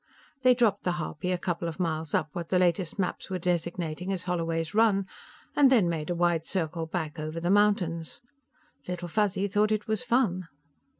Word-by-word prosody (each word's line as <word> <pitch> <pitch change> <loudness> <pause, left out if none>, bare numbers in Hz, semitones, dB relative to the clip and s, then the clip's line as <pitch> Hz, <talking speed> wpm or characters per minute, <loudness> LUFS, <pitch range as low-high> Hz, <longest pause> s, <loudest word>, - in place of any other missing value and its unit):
They 255 -1 +6
dropped 220 -5 +2
the 180 - +1
harpy 170 +1 -3
a 180 - +1
couple 175 -1 -2
of 165 0 -6
miles 160 -3 -1
up 155 - 0
what 170 -1 -5
the 185 - +3
latest 180 0 +1
maps 185 0 -2
were 185 - -1
designating 175 0 -2
as 185 -3 -2
Holloway's 165 -2 -2
Run, 210 -3 +3 0.5
and 275 -2 +6
then 220 -9 +5
made 160 -2 -2
a 175 - 0
wide 170 -2 +2
circle 165 -2 -2
back 160 -1 -4
over 155 +2 -4
the 175 +2 0
mountains. 190 -6 +2 0.7
Little 180 -1 -4
Fuzzy 200 +1 +1
thought 210 +2 +2
it 215 +1 -1
was 220 +2 0
fun. 230 -8 +1
180 Hz, 185 wpm, -28 LUFS, 165-200 Hz, 0.7 s, They